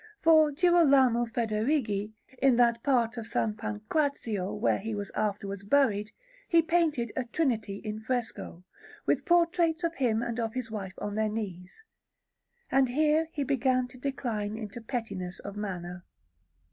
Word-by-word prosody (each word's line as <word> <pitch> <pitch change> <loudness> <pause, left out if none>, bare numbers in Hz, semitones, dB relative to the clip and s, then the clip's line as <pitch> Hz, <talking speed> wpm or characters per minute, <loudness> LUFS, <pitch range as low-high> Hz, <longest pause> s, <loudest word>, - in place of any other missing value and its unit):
For 315 -2 +5
Girolamo 280 -8 +4
Federighi, 220 -2 -1 0.3
in 270 -2 +5
that 235 -1 +3
part 245 -3 +1
of 225 -1 -5
S. - - -16 0.2
Pancrazio 215 - -2
where - - +1
he 220 +2 -4
was 205 -1 -5
afterwards 200 -2 -3
buried, 210 -3 +2 0.4
he 335 -1 +5
painted 315 -9 +1
a 260 - -1
Trinity 235 -6 -1
in 215 0 -4
fresco, 225 -6 -4 0.4
with - - +1
portraits 340 -1 +2
of 335 0 0
him 235 -7 +1
and 235 0 -3
of 225 0 -2
his 245 -3 -4
wife 195 -4 -5
on 205 0 -4
their 215 +1 0
knees; 200 - -6 0.9
and 265 -1 +4
here 305 +4 +2
he 290 - -2
began 255 -2 +1
to 255 0 -14
decline 225 -6 -3
into 220 +1 -7
pettiness 220 -7 -4
of 200 0 -8
manner. 180 -4 -5
235 Hz, 145 wpm, -29 LUFS, 210-280 Hz, 0.9 s, For